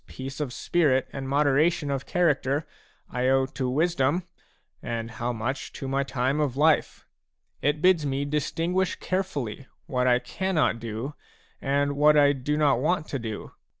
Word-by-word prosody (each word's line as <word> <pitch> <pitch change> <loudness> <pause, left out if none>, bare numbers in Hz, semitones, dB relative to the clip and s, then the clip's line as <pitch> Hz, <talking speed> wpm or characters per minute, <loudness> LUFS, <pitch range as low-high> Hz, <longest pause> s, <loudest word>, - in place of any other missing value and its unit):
peace 135 +2 -7
of 145 -4 -2
spirit 140 -2 +1
and 135 -1 -5
moderation 145 +2 +2
of 135 -1 -3
character 150 -4 +1 0.5
I 125 +1 0
owe 135 0 +3
to 130 -1 -3
wisdom 155 +2 +1 0.6
and 115 0 -4
how 120 +2 -3
much 120 +4 -3
to 135 - -6
my 135 +1 0
time 135 +1 -1
of 140 -4 0
life; 155 +1 +2 0.6
it 150 +3 0
bids 180 -4 +5
me 140 0 -1
distinguish 165 +5 0
carefully 145 - -3 0.2
what 125 -1 0
I 125 -1 +5
cannot 155 -1 0
do 115 +5 -5 0.5
and 140 +1 +1
what 150 +1 +5
I 145 -1 +6
do 145 +2 -2
not 145 -5 +3
want 155 +3 0
to 140 - -2
do. 110 -3 -6
140 Hz, 155 wpm, -26 LUFS, 130-150 Hz, 0.6 s, I